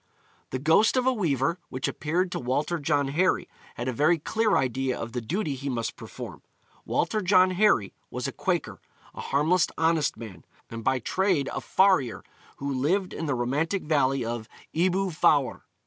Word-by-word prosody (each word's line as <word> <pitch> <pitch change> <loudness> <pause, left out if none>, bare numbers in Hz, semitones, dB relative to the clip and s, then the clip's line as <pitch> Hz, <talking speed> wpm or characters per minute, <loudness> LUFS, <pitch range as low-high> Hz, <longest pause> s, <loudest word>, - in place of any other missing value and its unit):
' - - -36
The - - -2
ghost 160 - +4
of 255 - +2
a 260 - +3
weaver, 170 - 0
which 130 0 -3
appeared 175 +4 -1
to - - -2
Walter 145 +7 -1
John 145 -1 +1
Harry, 180 +6 +1 0.3
had 120 - -4
a 130 - -1
very 155 +7 +3
clear 220 +7 +1
idea 130 0 0
of 115 - -5
the 125 - -3
duty 155 - -2
he 135 +1 -5
must 115 -3 -2
perform: - - -9 0.4
Walter 215 - 0
John 185 0 +4
Harry 180 - +2 0.2
was - - -4
a - - -3
Quaker, - - -2 0.3
a - - -7
harmless, 155 +5 +2
honest 160 -4 +1
man, 105 -8 -10 0.3
and 115 0 -6
by 130 +2 +2
trade 170 - 0
a - - -3
farrier, 185 - +2 0.3
who 140 0 -3
lived 180 +9 0
in 160 - -4
the 140 - 0
romantic 150 +10 -1
valley 135 -4 +1
of 115 -1 -4 0.2
Ebwy 185 +3 +1
Fawr. 145 -3 +2
150 Hz, 180 wpm, -26 LUFS, 130-185 Hz, 0.4 s, ghost